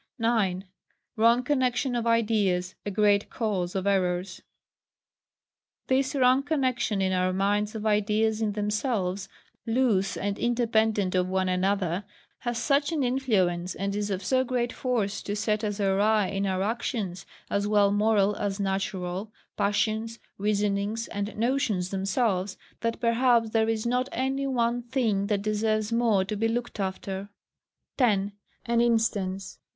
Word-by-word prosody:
9. 215 -6 +1 0.5
Wrong 230 +2 +4
connexion 255 -1 0
of 235 -1 -1
ideas 210 -6 +1
a - - +1
great 205 0 +2
Cause 195 -6 -2
of 190 0 -1
Errors. 185 -1 0 1.4
This 260 +1 +1
wrong 260 0 +4
connexion 255 -8 0
in 190 0 +1
our 185 0 +1
minds 205 +3 0
of 220 0 -5
ideas 215 +1 +1
in 210 -2 0
themselves 205 -2 -1 0.4
loose 225 -5 +1
and 200 0 -2
independent 220 -5 +1
of 185 0 +1
one 190 0 0
another, 185 0 0 0.4
has 240 -1 -3
such 285 +4 +1
an 305 -4 0
influence, 195 -9 0
and 200 +1 -2
is 205 0 -2
of 190 -1 -2
so 260 +3 +2
great 245 -2 -1
force 230 -6 -1
to 205 - -4
set 210 +1 0
us 205 -1 -2
awry 205 +2 +3
in 195 0 -1
our 190 0 0
actions, 210 -4 -3 0.2
as 200 0 0
well 205 -1 +4
moral 205 -1 +2
as 200 -1 -2
natural, 190 0 -2 0.2
passions, 215 +2 0 0.2
reasonings, 205 +2 0
and 205 0 -4
notions 225 -6 0
themselves, 195 0 0 0.2
that 230 0 -2
perhaps 235 -1 +3
there 220 0 +2
is 225 0 -1
not 250 +2 0
any 270 +2 -1
one 240 -2 0
thing 230 -5 0
that 200 -2 0
deserves 215 +1 0
more 225 -5 +2
to 210 - -3
be 225 +2 +1
looked 235 0 -3
after. 190 +1 -4 0.7
10. 205 -5 +2 0.3
As 235 -1 +1
instance. 205 -5 0
210 Hz, 145 wpm, -27 LUFS, 195-235 Hz, 1.4 s, Wrong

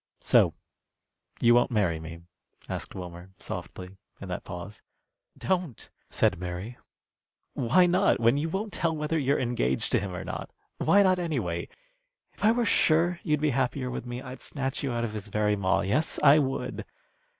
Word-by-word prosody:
"So - - +4 0.9
you 120 0 +6
won't 120 +1 +4
marry 100 -9 +1
me?" 80 +1 -9 0.5
asked - - -5
Wilmer, 90 0 -8
softly, 90 +1 -7 0.2
in - - -8
that - - -4
pause. 90 +4 -8 0.6
"Don't!" 180 - -2 0.2
said - - +1
Mary. 90 +6 -6 0.7
"Why 155 +10 +4
not, 180 +1 +3
when 115 +2 +4
you 150 +3 -1
won't 200 +3 -3
tell 165 -1 0
whether 150 +1 -1
you're 140 0 +2
engaged 115 - -1
to - - +3
him 95 -2 -5
or - - -5
not? - - -6 0.3
Why 200 0 +5
not, 185 -1 +3
anyway? 120 - -2 0.7
If - - -12
I 215 - +6
were 240 0 +1
sure 170 -2 +3
you'd 150 -3 0
be 150 -1 +2
happier 130 0 -1
with 125 - -5
me, 120 +1 -5
I'd 130 0 -9
snatch 135 -2 -3
you 140 - -2
out 120 0 -1
of 110 -2 -3
his 105 -1 -5
very 105 0 +1
maw. 95 -2 +1
Yes, 125 +12 0
I 150 +1 +8
would. 135 -2 -2
125 Hz, 170 wpm, -27 LUFS, 100-155 Hz, 0.9 s, I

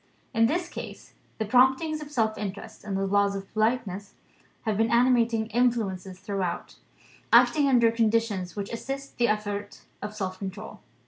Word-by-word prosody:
In 225 -1 +4
this 345 +6 -1
case, - - -9 0.2
the 220 - -1
promptings 265 +7 +3
of 295 - -8
self 220 -6 0
interest, 205 +2 -7
and 200 -2 -3
the 195 - 0
laws 200 0 +2
of 195 0 -7
politeness, 215 -3 -1 0.5
have 220 -2 0
been 225 +2 +2
animating 235 -2 +3
influences 205 -6 0
throughout; 195 -3 -3 0.5
acting 295 -2 +6
under 235 -3 +5
conditions 225 -5 0
which 205 +1 -5
assist 275 +4 -6
the 240 - +4
effort 205 -1 -3 0.2
of 210 +1 -6
self 185 -3 -4
control. 195 +2 -7
220 Hz, 150 wpm, -27 LUFS, 200-240 Hz, 0.5 s, acting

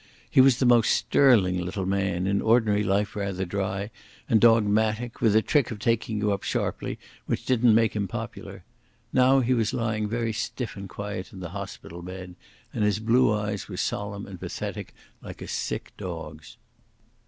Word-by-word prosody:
He - - +7
was 130 -2 +5
the 130 - +1
most 120 -2 +5
sterling 100 -10 +3
little 95 +2 -3
man, 95 -2 0
in 100 +1 +1
ordinary 110 -2 +3
life 100 +1 0
rather 100 -2 -2
dry 95 +2 -3 0.4
and 110 - +3
dogmatic, 110 +1 +3
with 110 -3 +3
a 110 - +5
trick 145 -6 +2
of 115 - -5
taking 115 0 0
you 105 0 +1
up 100 - -3
sharply - - -2 0.3
which - - -2
didn't 125 -3 +4
make 115 -1 +2
him 100 -2 -1
popular. - - -7 0.5
Now 130 +1 +5
he 125 +1 +1
was 115 -3 0
lying 110 -2 -1
very 115 0 -1
stiff 115 +1 -4
and 100 -1 -8
quiet 100 -2 -6
in 95 - -10
the 90 -2 -6
hospital 95 -2 -8
bed, 90 0 -8 0.4
and - - -1
his 105 -1 +2
blue 115 +2 +3
eyes 105 -1 -2
were - - -6
solemn 100 0 -3
and 95 -3 -10
pathetic - - -6 0.3
like - - -9
a - - -8
sick - - -4
dog's. 80 -4 -8
105 Hz, 175 wpm, -26 LUFS, 95-115 Hz, 0.5 s, He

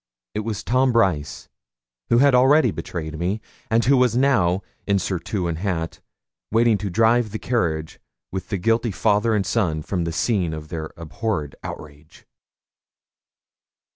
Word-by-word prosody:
It - - -2
was 105 -3 -4
Tom 130 +2 +2
Brice, 95 -11 0 0.6
who 115 - +4
had 140 +2 +5
already 130 0 +5
betrayed 80 -2 -5
me, 95 +5 -1 0.3
and 115 +2 +2
who 140 +3 +5
was 125 -2 +3
now, 100 -9 +2 0.2
in 100 -1 +3
surtout 95 0 -2
and 85 -2 -2
hat, 85 -4 -3 0.5
waiting 115 -1 +3
to 105 - -3
drive 115 +4 +3
the 110 - -4
carriage 80 -11 -2 0.3
with 95 -1 -5
the 100 - -1
guilty 115 +5 +1
father 105 +2 +2
and 100 -2 0
son 90 -7 0
from 90 -1 -2
the 85 - -2
scene 90 -2 0
of 75 0 -9
their 80 -2 -5
abhorred 85 -2 -3
outrage. 75 +1 -10
100 Hz, 150 wpm, -22 LUFS, 85-115 Hz, 0.6 s, had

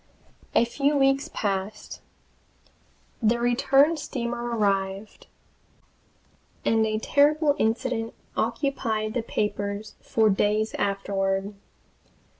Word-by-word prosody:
A - - +5
few 280 +4 0
weeks 275 +2 +2
passed. 200 0 -3 1.2
The 230 +1 +2
return 270 +6 +3
steamer 240 -5 -4
arrived, 195 0 -1 1.4
and 225 0 +3
a 215 0 -1
terrible 290 +5 +3
incident 225 0 -1 0.2
occupied 225 -3 -1
the 240 - 0
papers 210 -1 -3
for 220 -1 +2
days 210 +2 +1
afterward. 195 0 -1
225 Hz, 85 wpm, -25 LUFS, 205-270 Hz, 1.4 s, A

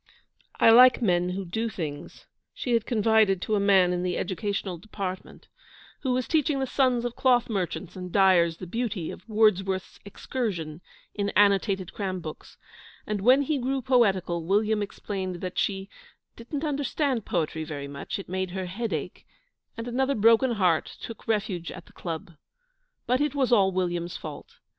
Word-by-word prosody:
'I 225 - +7
like 250 +2 +8
men 180 -3 +2
who 190 +1 -4
do 220 +6 -2
things,' 150 -7 -7 0.3
she 245 - -2
had 230 -2 +1
confided 220 -4 +3
to 220 - -2
a 210 - +3
man 190 -3 +4
in 175 - -1
the 180 -1 -1
Educational 190 -1 -3
Department, 190 -1 -7 0.5
who 260 - -1
was 250 -1 0
teaching 300 -3 +1
the 265 - 0
sons 255 -2 +1
of 240 - -3
cloth 250 -2 +3
merchants 185 -2 -3
and 180 -1 -7
dyers 175 -4 +4
the 185 - -7
beauty 210 -3 -3
of - - -12
Wordsworth's 195 -3 +1
'Excursion' 190 -7 -4 0.3
in 205 -1 -1
annotated 195 -2 +2
cram 190 -3 -3
books; 155 -3 -9 0.5
and 210 -2 -2
when 255 +6 +5
he 285 0 -1
grew 265 +2 -1
poetical, 195 -9 +2
William 210 +4 +1
explained 195 -2 -4
that 180 +1 -4
she 195 -1 -1 0.5
'didn't 275 +6 -6
understand 285 -4 -1
poetry 160 -6 -2
very 145 -3 -6
much; 140 0 -5
it 195 - -8
made 185 +1 -2
her 190 +1 -4
head 210 +5 -4
ache,' 160 +3 -5 0.5
and 230 +1 -5
another 265 +3 0
broken 230 +3 +4
heart 180 -7 +1
took 230 - -9
refuge 205 -6 -1
at 180 -2 -10
the - - -20
Club. 170 +2 -6 0.7
But 255 +2 +1
it 295 -1 0
was 265 -3 +1
all 195 -5 +5
William's 175 -2 -2
fault. 150 -2 -9
200 Hz, 165 wpm, -26 LUFS, 180-235 Hz, 0.7 s, like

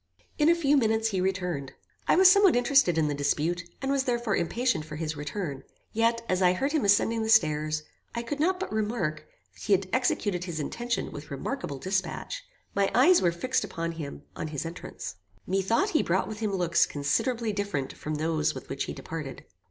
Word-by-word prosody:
In 300 +2 +5
a 340 - +6
few 295 -4 +3
minutes 225 -2 +2
he 190 -4 -1
returned. 180 -7 -2 0.3
I - - +5
was 375 +1 +7
somewhat 390 -3 +6
interested 245 - +4
in 155 -2 +3
the 145 - 0
dispute, 155 +5 -1
and 270 - 0
was 275 -1 +1
therefore 240 -5 0
impatient 230 0 0
for 155 0 -8
his 155 0 -3
return; 150 -1 -4 0.3
yet, 230 +1 +1
as 185 0 0
I 180 -1 +5
heard 275 +10 -1
him 310 -3 +1
ascending 215 +3 +3
the 220 - -2
stairs, 155 -6 +3 0.3
I 235 - -2
could 285 +5 -4
not 365 +4 +2
but 380 - -4
remark, 185 -9 -2 0.3
that - - -17
he 205 - +2
had 195 0 +2
executed 205 -7 0
his 170 -3 -4
intention 235 +10 -2
with 145 +1 -9
remarkable 145 - -4
dispatch. 190 - -3 0.3
My 200 -1 +2
eyes 295 +9 +6
were 175 - +3
fixed 255 +10 -1
upon 165 -1 -3
him 155 -4 -7
on - - -4
his 150 0 -4
entrance. 165 +2 -7 0.3
Methought 195 - +1
he 310 - +3
brought 185 +3 0
with 215 -1 -6
him 215 -2 -1
looks 175 -3 +2
considerably 220 - 0
different 200 -10 -2
from 155 0 -5
those 155 0 0
with - - -9
which - - -2
he - - -5
departed. - - -7
195 Hz, 200 wpm, -28 LUFS, 160-240 Hz, 0.3 s, was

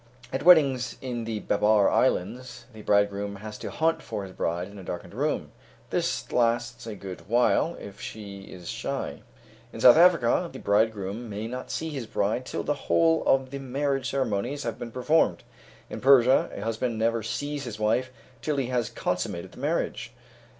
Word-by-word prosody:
At 135 - -1
weddings 140 -7 +5
in 120 -3 -4
the 110 -2 -3
Babar 105 -1 +3
Islands, 120 +8 0
the 110 - -10
bridegroom 100 0 +1
has 105 +1 -8
to - - -5
hunt 165 +1 +1
for 105 -3 -5
his 95 - -8
bride 85 0 -2
in 100 0 -11
a - - -9
darkened 90 -1 -6
room. - - -1 0.4
This - - -1
lasts 120 0 0
a 110 - -5
good 95 -2 -9
while 125 +8 +3
if 100 0 -10
she 100 -2 -7
is 90 -2 -10
shy. - - -4 0.5
In - - -9
South 125 +3 +8
Africa, 170 -1 +4
the - - -8
bridegroom 105 +1 0
may 105 +1 -4
not 125 +3 -6
see 160 - -3
his 135 -6 -5
bride 110 +5 -1
till - - -3
the 145 - 0 0.2
whole 165 -1 +4
of 135 -1 +3
the 140 - -5
marriage 135 0 -1
ceremonies 130 +2 -1
have 115 - -4
been 115 - -6
performed. 125 - +2 0.4
In - - -7
Persia, 130 -1 +5
a - - -7
husband 115 +2 -2
never 115 +1 +1
sees 145 +5 -3
his 110 -3 -6
wife 115 +4 +1 0.3
till 150 +2 -1
he 130 -3 -1
has 120 -3 0
consummated - - -3
the - - -14
marriage. - - -2
115 Hz, 180 wpm, -27 LUFS, 105-135 Hz, 0.5 s, South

